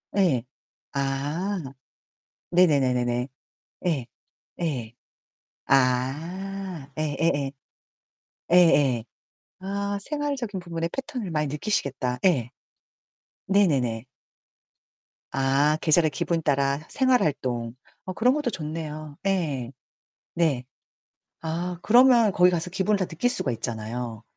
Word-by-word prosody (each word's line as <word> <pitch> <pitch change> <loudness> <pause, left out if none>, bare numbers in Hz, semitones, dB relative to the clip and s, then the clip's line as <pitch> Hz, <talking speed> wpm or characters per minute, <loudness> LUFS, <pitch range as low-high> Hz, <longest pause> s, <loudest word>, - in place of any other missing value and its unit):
예. 170 - +3 0.5
아. 145 +8 -1 0.9
네네네네네. 125 -8 +3 0.6
예. 145 -9 0 0.5
예. 130 -10 -2 0.7
아. 155 +7 0
예 155 -2 -1
예예. 145 -4 +1 1.0
예예. 145 -9 +5 0.6
아 200 +1 -2
생활적인 280 -5 -3
부분의 170 -1 -3
패턴을 265 -7 -4
많이 150 -2 0
느끼시겠다. 135 - -1
예. 140 -11 +3 1.0
네네네. 135 - +2 1.3
아. 135 +3 +2
계절의 160 0 +4
기분 165 +3 -1
따라 140 -2 +1
생활 260 -2 +3
활동. 120 -6 -1 0.3
어 185 - -4
그런 245 +6 +3
것도 295 -3 0
좋네요. 155 -4 -6
예. 150 -11 -1 0.6
네. 155 -7 +1 0.8
아 170 +2 -3
그러면 240 -2 +6
거기 180 0 +5
가서 175 0 -2
기분을 195 +3 +1
다 185 - 0
느낄 175 +10 0
수가 145 - +2
있잖아요. 115 0 -4
160 Hz, 195 characters per minute, -25 LUFS, 135-190 Hz, 1.3 s, 그러면